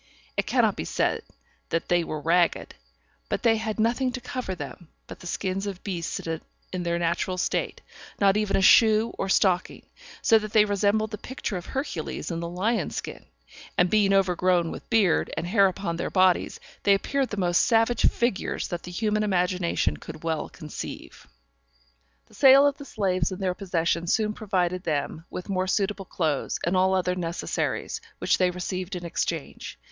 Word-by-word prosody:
It - - -1
cannot - - +3
be - - -4
said - - 0 0.5
that 165 - -1
they 175 -1 +2
were 155 -1 -4
ragged, 170 +3 +1 0.6
but - - -2
they 225 -2 +4
had 220 0 -3
nothing 240 +3 +1
to 255 - -4
cover 245 -6 -4
them 175 0 -8 0.2
but - - -10
the 175 - -9
skins 190 +3 -2
of 195 -2 -6
beasts 175 -5 -3 0.5
in 185 - -2
their 170 0 -1
natural 170 +2 -1
state, 180 - -1 0.4
not 195 -1 +4
even 210 -1 +1
a 195 - +1
shoe 220 +2 +6
or 195 - -1
stocking; 185 -2 +1 0.4
so 225 - +6
that 215 -1 -7
they 215 -1 +6
resembled 205 +2 +1
the 210 - -5
pictures 240 -7 -4
of 175 - -12
Hercules 265 - -4
in 165 - -3
the 170 0 -4
lion's 210 +7 -1
skin; - - -6 0.5
and 180 0 +3
being 210 -2 +4
overgrown 180 -3 +2
with - - -9
beard, 210 -7 +3
and - - -2
hair 195 +2 +4
upon 180 -2 -3
their - - -2
bodies, 185 -2 +2 0.2
they 200 - +5
appeared 270 +6 -1
the 205 - -5
most 175 -2 +3
savage 230 0 +2
figures 235 -4 -1
that 175 -2 -4
the 180 - -9
human 215 +3 0
imagination 180 -3 0
could 155 0 -10
well 160 -1 -2
conceive. 155 -4 -8 1.0
The - - -24
sale 275 0 +7
of 285 -1 +1
the 285 - -8
slaves 195 -7 0
in 185 - -4
their 185 -2 0
possession 175 -3 -1
soon 215 +3 +1
provided 185 -4 -1
them 155 0 -2
with 180 - -7
more 185 -2 -1
suitable 195 0 -1
clothes, 155 -6 -1
and 175 +2 +1
all 190 +1 +3
other 180 -1 +1
necessaries, 175 - -3 0.2
which - - +1
they 185 -1 +4
received 180 +1 -4
in 175 -1 -6
exchange. 165 -2 -4
185 Hz, 180 wpm, -26 LUFS, 175-215 Hz, 1.0 s, sale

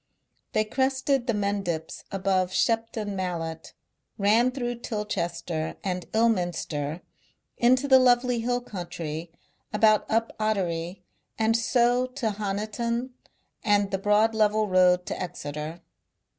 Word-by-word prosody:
They 215 - +2
crested 265 +2 0
the 235 - +1
Mendips 200 -6 -2
above 190 -2 +1
Shepton 220 +1 0
Mallet, 165 -3 -4 0.4
ran 220 +5 +4
through 245 -2 -4
Tilchester 170 -7 -3
and 180 -3 -3
Ilminster 175 -8 0 0.5
into 255 +3 +3
the 265 -1 +7
lovely 245 -1 +3
hill 245 +2 0
country 170 -6 -6 0.4
about 215 0 +3
Up 225 +1 0
Ottery 180 -4 -1 0.3
and 225 0 +2
so 245 +2 +2
to 250 -4 -2
Honiton 215 +5 -2 0.5
and 205 -1 +2
the 195 - -1
broad 210 +3 +3
level 215 0 +2
road 180 -1 +4
to - - -4
Exeter. 155 -2 -5
210 Hz, 115 wpm, -26 LUFS, 180-235 Hz, 0.5 s, the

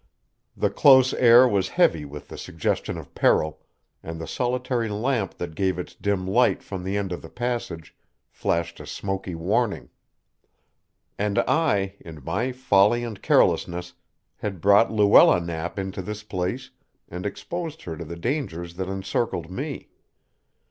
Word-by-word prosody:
The - - +1
close 130 -2 +6
air 120 +1 +7
was 100 -5 0
heavy 80 -3 +3
with 75 +1 -10
the - - -8
suggestion 80 - -2
of - - -11
peril, 80 0 +2 0.4
and 80 0 -7
the 80 - -5
solitary 125 -2 -1
lamp 110 -1 -1
that 85 -2 -6
gave 95 +1 0
its 90 - -6
dim 100 -2 -2
light 120 +6 +2
from 95 -2 -6
the 95 +2 -2
end 100 -2 -2
of 90 - -4
the - - -11
passage 120 -10 -4 0.3
flashed 85 0 -2
a - - -10
smoky 95 -2 -4
warning. 100 +6 -1 1.3
And 105 -1 -1
I, 100 -12 +1
in 80 -4 -11
my 120 +10 -1
folly 120 -2 +3
and 110 -4 -6
carelessness, 90 0 +2 0.4
had 100 -4 -5
brought 100 +5 +5
Luella 105 -4 +6
Knapp 85 +1 -5
into 95 -1 -4
this 105 +3 -6
place 105 +6 -4 0.4
and 90 +1 -7
exposed 160 - -5
her 80 - -5
to 85 - -7
the 85 +1 -7
dangers 85 - -3
that 95 0 -3
encircled 95 -2 -2
me. 95 - -5
95 Hz, 150 wpm, -24 LUFS, 85-120 Hz, 1.3 s, air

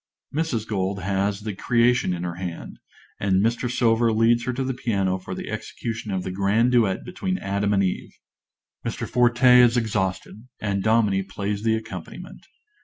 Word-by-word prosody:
(_Mrs. 140 -8 -1
Gold 95 -2 -2
has 100 +1 -1
"The 105 0 -4
Creation" 120 +1 +2
in 90 -1 -3
her 90 -1 -3
hand, 85 -1 -7 0.4
and 95 -1 +2
Mr. 120 +2 0
Silver 115 -1 +2
leads 115 +2 +3
her 130 - -1
to 135 +2 -2
the 130 0 -2
piano 100 -7 -1
for 90 - -7
the - - -6
execution 115 -1 -5
of 95 -2 -2
the 95 - -4
grand 100 +6 +2
duet 110 -6 +2
between 185 +1 -3
Adam 100 - -1
and 100 -1 +3
Eve. 95 - -3 0.7
Mr. - - -4
Forte 125 +1 +5
is 120 0 +4
exhausted, 110 0 -2
and 100 -2 -1
Dominie 110 -2 +2
plays 100 +1 -4
the 110 0 +2
accompaniment. 110 - -8
110 Hz, 170 wpm, -24 LUFS, 95-120 Hz, 0.7 s, Forte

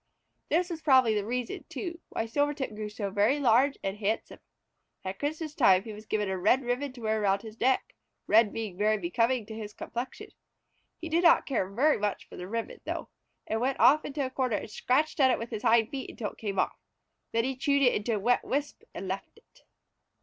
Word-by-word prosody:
This 350 +3 +1
was 325 -2 -5
probably 260 -7 +5
the 210 -1 0
reason, 245 +2 -3
too, 340 -3 -5
why 225 - -2
Silvertip 285 0 -1
grew 210 0 -5
so 205 -1 -4
very 210 +9 +2
large 265 +2 +4
and 195 +1 -2
handsome. 215 +1 -2 0.7
At 190 +1 -4
Christmas 310 +1 -3
time 190 -8 +5
he 220 -1 -7
was 215 +1 -11
given 210 -1 0
a 190 -1 -2
red 245 +8 +3
ribbon 250 +3 -1
to 245 - -12
wear 220 -1 0
around 200 -1 +1
his 220 0 -10
neck, 260 +2 +1 0.3
red 215 -1 +5
being 215 -5 -5
very 215 +1 +3
becoming 230 +6 0
to 220 - -8
his 215 -1 -7
complexion. 240 +2 -6 0.7
He 335 - -6
did 330 +2 +1
not 335 - +6
care 195 -9 -1
very 265 +9 +2
much 205 -1 -2
for - - -12
the 180 - -7
ribbon, 230 +3 -4
though, - - -4 0.4
and 220 +1 -2
went 265 +2 0
off 300 +4 +6
into 285 -1 -2
a 260 - -5
corner 255 -5 0
and 210 - -7
scratched 300 +9 0
at 265 -2 +6
it 250 - +3
with 230 +2 -6
his 215 -2 -4
hind 225 -1 +3
feet 270 -2 -5
until 210 -3 -5
it - - -20
came 200 -3 -3
off. - - 0 0.5
Then 230 0 +1
he 265 +2 -1
chewed 280 +2 +2
it 245 - +5
into 215 +2 0
a - - -1
wet 240 +5 +2
wisp 285 +2 -2
and - - -5
left - - -4
it. - - -24
230 Hz, 220 wpm, -29 LUFS, 210-275 Hz, 0.7 s, not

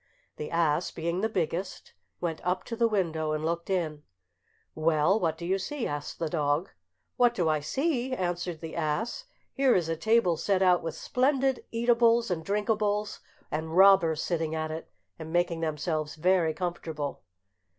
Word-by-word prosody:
The 150 - -5
ass, 165 0 +1
being 170 +2 -2
the 220 - +1
biggest, 185 -1 -3 0.3
went 165 -2 -3
up 180 +1 0
to 230 - -5
the 230 0 +3
window, 160 -7 0
and 155 0 -2
looked 170 +2 -2
in. 160 -6 -1 0.7
"Well, 155 +5 +2
what 160 -4 0
do 170 - -6
you 190 +2 +1
see?" 260 +7 -3
asked 145 0 -4
the 165 - -2
dog. 150 +1 0 0.5
"What 240 -1 +4
do 175 -3 +1
I 155 -1 +2
see?" 260 - -1
answered 175 -6 -2
the 160 -1 -7
ass; 170 - -2 0.3
"here 270 -2 +3
is 170 -3 +1
a 165 - 0
table 200 -1 +2
set 190 +2 +1
out 180 -1 +4
with 165 -2 -4
splendid 265 0 +1
eatables 235 -1 +3
and 165 -2 -2
drinkables, 210 +2 0 0.3
and 160 +2 -3
robbers 190 -5 +6
sitting 160 -2 -1
at 155 0 -2
it 160 +1 -6 0.3
and 160 0 -7
making 175 -1 +1
themselves 155 -1 -2
very 170 -1 +2
comfortable." 160 -5 -4
175 Hz, 165 wpm, -28 LUFS, 160-210 Hz, 0.7 s, robbers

